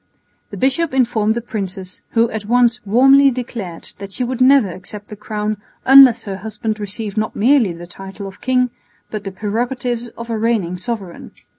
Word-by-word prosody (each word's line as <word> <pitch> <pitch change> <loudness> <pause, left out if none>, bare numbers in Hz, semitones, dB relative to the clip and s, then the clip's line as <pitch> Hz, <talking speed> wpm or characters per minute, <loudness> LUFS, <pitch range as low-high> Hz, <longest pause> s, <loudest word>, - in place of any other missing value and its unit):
The - - -8
bishop 270 +3 0
informed 225 -4 +2
the 235 - -2
princess, 190 -4 -6
who 230 0 +3
at 210 -2 -5
once 240 0 +2
warmly 270 +6 +6
declared 230 -9 -6
that 200 -1 -8
she 250 - -2
would 255 +1 -3
never 260 -5 +5
accept 200 +4 -9
the 210 - -7
crown 210 0 -3 0.3
unless 260 -3 +8
her 195 -2 -5
husband 215 +2 -4
received 210 +1 -4
not 215 0 -1
merely 240 -3 +3
the 170 +1 -9
title 195 +3 -9
of 195 0 -10
king, 250 -1 +1 0.4
but 210 -1 -5
the 195 - -4
prerogatives 240 +4 -2
of 235 0 -6
a 225 - -1
reigning 215 -6 0
sovereign. 195 -3 -6
220 Hz, 175 wpm, -18 LUFS, 200-245 Hz, 0.4 s, unless